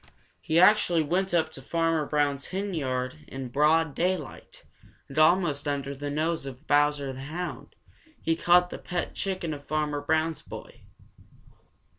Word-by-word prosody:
He 160 Hz, +2 st, +2 dB
actually 180 Hz, -4 st, +5 dB
went 185 Hz, +5 st, 0 dB
up 160 Hz, -2 st, +1 dB
to 135 Hz, -, -10 dB
Farmer 165 Hz, +1 st, 0 dB
Brown's 145 Hz, -2 st, 0 dB
henyard 150 Hz, -9 st, -3 dB
in 135 Hz, -1 st, -6 dB
broad 150 Hz, +3 st, +3 dB
daylight, 175 Hz, -, -3 dB, 0.4 s
and 140 Hz, +3 st, -3 dB
almost 155 Hz, -3 st, +3 dB
under 140 Hz, -1 st, -2 dB
the 145 Hz, +1 st, -5 dB
nose 155 Hz, 0 st, -1 dB
of 135 Hz, +3 st, -9 dB
Bowser 145 Hz, -2 st, +2 dB
the 130 Hz, -, -8 dB
Hound 165 Hz, +6 st, -6 dB, 0.4 s
he 165 Hz, -, 0 dB
caught 180 Hz, +1 st, +4 dB
the -, -, -6 dB
pet 175 Hz, 0 st, -3 dB
chicken 185 Hz, -5 st, -3 dB
of 145 Hz, -1 st, -10 dB
Farmer 150 Hz, -1 st, -1 dB
Brown's 160 Hz, +2 st, 0 dB
boy. -, -, -11 dB
155 Hz, 145 wpm, -27 LUFS, 145-170 Hz, 0.4 s, actually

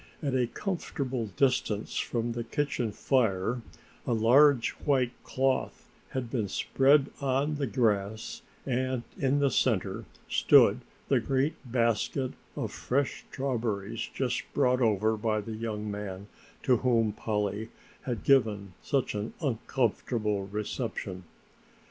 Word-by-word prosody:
At 140 Hz, -3 st, 0 dB
a 125 Hz, -2 st, +2 dB
comfortable 135 Hz, -, -3 dB
distance 105 Hz, 0 st, 0 dB
from 120 Hz, 0 st, -1 dB
the 120 Hz, 0 st, -3 dB
kitchen 135 Hz, -5 st, -1 dB
fire 115 Hz, -1 st, +1 dB, 0.5 s
a 120 Hz, -, +2 dB
large 125 Hz, +3 st, +5 dB
white 130 Hz, -4 st, +2 dB
cloth 130 Hz, 0 st, -1 dB, 0.2 s
had 125 Hz, -3 st, -4 dB
been 115 Hz, -6 st, 0 dB
spread 135 Hz, +7 st, +3 dB
on 140 Hz, +3 st, +1 dB
the 140 Hz, -2 st, -1 dB
grass 110 Hz, -1 st, 0 dB, 0.2 s
and 130 Hz, -1 st, -1 dB, 0.2 s
in 135 Hz, +1 st, +2 dB
the 140 Hz, -2 st, +2 dB
center 105 Hz, -2 st, +1 dB, 0.2 s
stood -, -, +5 dB, 0.3 s
the -, -, +3 dB
great 135 Hz, +3 st, +1 dB, 0.2 s
basket 120 Hz, +2 st, +1 dB, 0.2 s
of -, -, -3 dB
fresh 140 Hz, +2 st, -1 dB
strawberries 115 Hz, -5 st, -2 dB
just 125 Hz, -3 st, -1 dB
brought 125 Hz, -2 st, +3 dB
over 110 Hz, -1 st, +2 dB
by 110 Hz, 0 st, 0 dB
the 110 Hz, +2 st, -6 dB
young 110 Hz, -1 st, -4 dB
man 100 Hz, -1 st, -5 dB, 0.4 s
to 130 Hz, -4 st, +4 dB
whom 115 Hz, -3 st, +2 dB
Polly 105 Hz, 0 st, -2 dB, 0.3 s
had 120 Hz, -5 st, -4 dB
given 105 Hz, -8 st, +3 dB
such 135 Hz, -2 st, 0 dB
an 105 Hz, +1 st, -4 dB
uncomfortable 115 Hz, -6 st, -1 dB
reception. 105 Hz, -3 st, -4 dB
120 Hz, 125 wpm, -29 LUFS, 105-130 Hz, 0.5 s, large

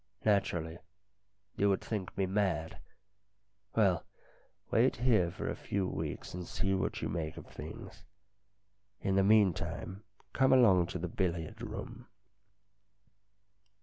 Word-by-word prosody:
" -, -, -27 dB
Naturally. 85 Hz, -5 st, +1 dB, 0.8 s
You 100 Hz, -, +3 dB
would 95 Hz, -, +2 dB
think 105 Hz, -5 st, -4 dB
me 95 Hz, -, +2 dB
mad. 95 Hz, -5 st, -1 dB, 1.0 s
Well, 100 Hz, -5 st, +3 dB, 0.7 s
wait 120 Hz, +4 st, +4 dB
here 115 Hz, -8 st, +3 dB
for 90 Hz, -, -5 dB
a -, -, -1 dB
few 100 Hz, -2 st, -2 dB
weeks, 80 Hz, -4 st, -4 dB
and 90 Hz, -1 st, -5 dB
see 95 Hz, 0 st, 0 dB
what 95 Hz, -, -1 dB
you -, -, 0 dB
make 80 Hz, -2 st, -3 dB
of -, -, -8 dB
things. -, -, -9 dB, 1.0 s
In 95 Hz, -, +1 dB
the 95 Hz, -, +4 dB
meantime, 100 Hz, -1 st, +2 dB, 0.3 s
come 130 Hz, 0 st, +4 dB
along 95 Hz, -9 st, +6 dB
to 90 Hz, -, -4 dB
the 90 Hz, +1 st, -3 dB
billiard 90 Hz, -7 st, -2 dB
room." -, -, -7 dB
95 Hz, 130 wpm, -32 LUFS, 85-105 Hz, 1.0 s, along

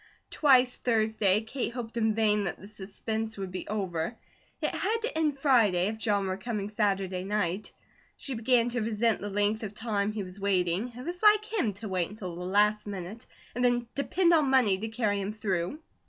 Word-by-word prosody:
Twice 255 Hz, -4 st, +4 dB
Thursday, 220 Hz, -4 st, +2 dB
Kate 235 Hz, +2 st, -3 dB
hoped 235 Hz, -2 st, -6 dB
in 220 Hz, -2 st, +1 dB
vain 210 Hz, -2 st, +2 dB
that 175 Hz, -, -3 dB
the -, -, -11 dB
suspense 215 Hz, +2 st, -4 dB
would 190 Hz, -2 st, -5 dB
be 185 Hz, -, -5 dB
over. 190 Hz, -1 st, -2 dB, 0.4 s
It -, -, 0 dB
had 430 Hz, +4 st, 0 dB
to 470 Hz, -, -2 dB
end 305 Hz, -3 st, +1 dB
Friday, 220 Hz, -10 st, +3 dB
if 220 Hz, 0 st, -6 dB
John 205 Hz, -3 st, +1 dB
were 190 Hz, 0 st, -2 dB
coming 210 Hz, -1 st, -3 dB
Saturday 195 Hz, -3 st, 0 dB
night. 200 Hz, -1 st, -2 dB, 0.5 s
She 275 Hz, -, -4 dB
began 235 Hz, 0 st, +2 dB
to 245 Hz, 0 st, -1 dB
resent 225 Hz, 0 st, +1 dB
the 205 Hz, -, -4 dB
length 205 Hz, +2 st, 0 dB
of 210 Hz, -2 st, -6 dB
time 210 Hz, -2 st, -1 dB
he 210 Hz, -1 st, -4 dB
was 185 Hz, +1 st, -8 dB
waiting. 195 Hz, +3 st, 0 dB
It 250 Hz, -, -8 dB
was 355 Hz, +1 st, -5 dB
like 425 Hz, 0 st, +6 dB
him 390 Hz, -, -1 dB
to 210 Hz, +3 st, -7 dB
wait 185 Hz, -3 st, -1 dB
until 190 Hz, -5 st, -7 dB
the 175 Hz, -, -7 dB
last 210 Hz, +3 st, +2 dB
minute, 200 Hz, +2 st, -7 dB, 0.3 s
and 245 Hz, -, -2 dB
then 245 Hz, -1 st, +2 dB
depend 340 Hz, +5 st, +2 dB
on 305 Hz, -4 st, +4 dB
money 250 Hz, -7 st, +4 dB
to 220 Hz, -, -3 dB
carry 215 Hz, -3 st, 0 dB
him 195 Hz, +1 st, -3 dB
through. 200 Hz, -, -2 dB
215 Hz, 200 wpm, -29 LUFS, 195-240 Hz, 0.5 s, like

